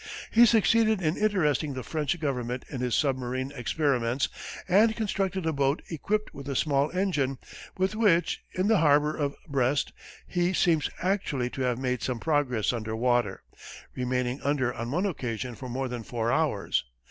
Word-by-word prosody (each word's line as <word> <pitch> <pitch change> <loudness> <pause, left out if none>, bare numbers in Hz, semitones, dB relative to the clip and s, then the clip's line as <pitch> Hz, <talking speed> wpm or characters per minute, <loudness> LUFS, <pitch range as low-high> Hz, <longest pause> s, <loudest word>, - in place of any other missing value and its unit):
He 235 +1 +7
succeeded 220 0 +4
in 160 -2 0
interesting 155 -9 +1
the 130 - -4
French 155 +3 -2
government 125 -4 -2
in 130 - -4
his 125 -2 0
submarine 130 -1 -1
experiments 125 -1 0 0.4
and 215 +4 +4
constructed 195 -4 -1
a 160 - +1
boat 140 +1 +1
equipped 210 +7 -2
with 140 0 -8
a 140 - -2
small 140 +1 +2
engine, 160 -8 0 0.4
with 190 +3 0
which, 195 -6 +2
in 185 +2 0
the 220 -3 +4
harbor 150 0 +4
of 145 -2 -2
Brest, 135 -1 0 0.3
he 175 0 0
seems 165 -4 +2
actually 150 -10 0
to 135 - -5
have 125 -2 +1
made 125 -2 -1
some 125 -3 -2
progress 135 -8 +1
under 110 -2 -3
water, 120 -4 +1 0.5
remaining 125 +1 -1
under 135 -4 0
on 115 +1 -5
one 175 +9 0
occasion 125 - -3
for 125 +3 -8
more 130 +2 -2
than 125 -1 -5
four 115 0 -2
hours. 135 - +1
140 Hz, 165 wpm, -27 LUFS, 125-175 Hz, 0.5 s, He